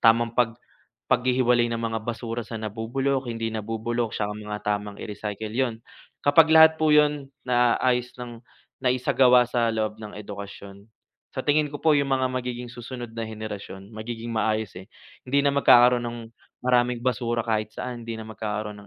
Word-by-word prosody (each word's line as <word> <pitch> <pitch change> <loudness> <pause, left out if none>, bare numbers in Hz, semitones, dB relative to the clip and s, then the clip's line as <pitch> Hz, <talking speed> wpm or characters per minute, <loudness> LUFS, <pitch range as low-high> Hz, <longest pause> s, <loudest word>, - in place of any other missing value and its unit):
tamang 115 0 +4
pag 115 -2 +1 0.6
paghihiwalay 125 -1 +3
ng 115 - -2
mga 115 -1 -2
basura 115 0 -3
sa 115 0 -7
nabubulok, 120 +5 -2
hindi 115 -1 -3
nabubulok, 115 +1 -2
saka 105 -1 -1
mga 105 0 -6
tamang 105 0 -2
i-recycle, 105 +1 -5
'yon. 120 -1 0 0.5
Kapag 155 +2 +6
lahat 160 0 +8
po 155 -1 +4
'yon, 150 -2 +3 0.2
naayos 125 0 +2
nang 120 -1 -8 0.4
naisagawa 125 -1 +4
sa 120 -1 0
loob 110 -1 -2
ng 105 -1 -8
edukasyon, 100 -1 -9 0.5
sa - - 0
tingin 150 0 +2
ko 145 - -6
po, 160 - +6
'yong 140 -2 +2
mga 130 -1 +1
magiging 125 -1 -4
susunod 120 -1 -8
na 115 -1 -5
henerasyon, 105 -2 -8
magiging 115 +1 -6
maayos 110 -2 0
eh, 95 - -15 0.4
hindi 140 +2 +2
na 140 - +3
magkakaroon 125 -3 +6
ng 120 0 -4 0.5
maraming 125 -1 +2
basura 120 -2 0
kahit 110 -2 0
saan, 120 -2 -5
hindi 115 - -3
na 110 - -7
magkakaroon 105 -1 -5
120 Hz, 160 wpm, -25 LUFS, 110-125 Hz, 0.6 s, lahat